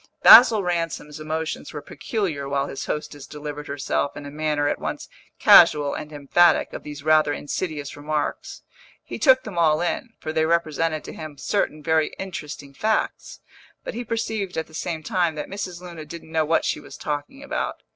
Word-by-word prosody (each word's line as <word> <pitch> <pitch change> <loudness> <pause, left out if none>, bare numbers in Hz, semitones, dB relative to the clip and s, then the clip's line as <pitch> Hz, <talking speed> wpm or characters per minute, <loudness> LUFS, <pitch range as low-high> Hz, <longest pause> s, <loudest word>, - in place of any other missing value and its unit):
Basil 225 -4 +9
Ransom's 165 -4 -3
emotions 155 +1 -4
were 150 - -5
peculiar 160 - -3
while 140 0 0
his 135 - -6
hostess 145 -2 -5
delivered 150 0 -7
herself, 140 0 -2
in 145 - -8
a 145 - -7
manner 150 -1 0
at - - -1
once - - -5 0.3
casual 145 -1 +7
and 150 - -6
emphatic, 150 +4 +3
of - - -6
these 145 -1 -9
rather 155 -1 +4
insidious 145 0 -4
remarks. 150 +1 -3 0.4
He - - -7
took 260 -2 +5
them 195 -6 -5
all 155 -2 +4
in, 175 +7 -2
for 155 - -5
they 160 0 +2
represented 165 -1 0
to - - -8
him 155 -2 -8
certain 155 0 -1
very 160 -1 +1
interesting 150 -7 -7
facts; 215 +9 -2 0.4
but - - -5
he 240 +1 -4
perceived 220 -4 -3
at 160 - -1
the 160 - -20
same 160 0 -4
time 175 -6 0
that 150 - -5
Mrs. 185 -3 -5
Luna 170 -3 -8
didn't 160 +1 -10
know 160 -1 +1
what 165 +2 +1
she - - -1
was - - -11
talking 150 - -5
about. 280 - -3
155 Hz, 180 wpm, -23 LUFS, 150-175 Hz, 0.4 s, Basil